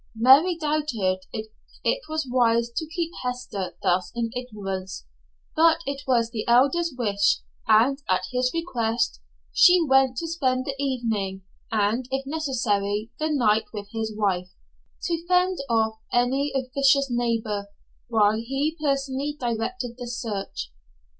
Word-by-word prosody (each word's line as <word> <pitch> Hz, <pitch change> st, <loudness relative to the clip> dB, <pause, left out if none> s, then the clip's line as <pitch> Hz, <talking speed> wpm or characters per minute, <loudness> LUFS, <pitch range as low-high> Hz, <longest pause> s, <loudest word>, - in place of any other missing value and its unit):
Mary 275 Hz, +10 st, +6 dB
doubted 295 Hz, -, 0 dB
if 220 Hz, 0 st, -6 dB, 0.3 s
it -, -, +1 dB
was 310 Hz, -3 st, -2 dB
wise 235 Hz, -2 st, +2 dB
to 320 Hz, -, -2 dB
keep 335 Hz, 0 st, -2 dB
Hester 220 Hz, -8 st, -4 dB
thus 180 Hz, +1 st, +1 dB
in 230 Hz, -1 st, -1 dB
ignorance, 195 Hz, -, -5 dB, 0.5 s
but 325 Hz, +1 st, +4 dB
it 275 Hz, 0 st, -3 dB
was 235 Hz, -3 st, +2 dB
the 225 Hz, -3 st, -3 dB
Elder's 280 Hz, +8 st, +4 dB
wish, 200 Hz, -4 st, +2 dB, 0.3 s
and 235 Hz, +6 st, +4 dB
at 185 Hz, 0 st, +2 dB
his 250 Hz, 0 st, +1 dB
request 235 Hz, -, -1 dB, 0.3 s
she 360 Hz, 0 st, +7 dB
went 265 Hz, -2 st, +3 dB
to 330 Hz, -, -2 dB
spend 260 Hz, -6 st, 0 dB
the 275 Hz, -, -2 dB
evening 220 Hz, -8 st, -2 dB, 0.3 s
and 220 Hz, +3 st, +1 dB
if 270 Hz, 0 st, -2 dB
necessary 230 Hz, -8 st, -1 dB
the 310 Hz, 0 st, 0 dB
night 225 Hz, -7 st, +2 dB
with 205 Hz, -1 st, -6 dB
his 225 Hz, -1 st, -3 dB
wife, 185 Hz, -4 st, 0 dB, 0.5 s
to 335 Hz, -2 st, -1 dB
fend 365 Hz, 0 st, +2 dB
off 220 Hz, -1 st, +1 dB
any 265 Hz, +4 st, +1 dB
officious 275 Hz, +1 st, +2 dB
neighbor, 225 Hz, -4 st, -1 dB, 0.4 s
while 215 Hz, -2 st, +3 dB
he 270 Hz, +7 st, -1 dB
personally 275 Hz, 0 st, -1 dB
directed 240 Hz, +2 st, -3 dB
the 245 Hz, -, -5 dB
search. 200 Hz, -, -4 dB
245 Hz, 135 wpm, -25 LUFS, 220-280 Hz, 0.5 s, she